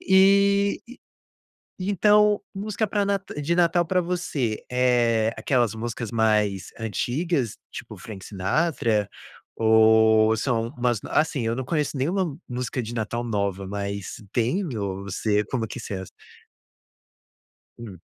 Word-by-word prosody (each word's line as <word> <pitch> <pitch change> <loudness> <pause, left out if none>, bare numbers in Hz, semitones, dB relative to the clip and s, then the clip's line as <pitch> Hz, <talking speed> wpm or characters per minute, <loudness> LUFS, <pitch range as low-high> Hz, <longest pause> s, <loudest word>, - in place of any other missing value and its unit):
E 200 +1 +4 1.0
e 185 +2 -2
então 210 +1 +4
música 210 +2 -2
pra 205 0 0
Nata 200 -6 -2
de 155 +4 0
Natal 175 0 +3
pra 180 +2 +1
você, 170 -11 -2
eh, 120 -3 +3
aquelas 120 -1 +1
músicas 115 0 -4
mais 105 -5 +1
antigas, 125 - -1
tipo - - -9
Frank 100 -4 -9
Sinatra? 105 - 0 0.5
Ou 110 0 +5
são 115 -1 0
umas 120 -2 +1
assim, 155 -5 +1
eu 115 - 0
não 130 - -3
conheço 150 +1 -1
nenhuma 165 +2 -1
música 125 0 -3
de 115 +1 -6
Natal 115 +1 -2
nova, 100 -4 -2
mas 100 0 -4 0.2
tem? 125 - 0
Ou 100 -2 -4
você 105 +2 0
como 115 -2 -2
que - - -7
você 105 - -6
é? 95 - -5 1.8
Hum. 105 -7 -9
120 Hz, 130 wpm, -24 LUFS, 110-170 Hz, 1.8 s, Ou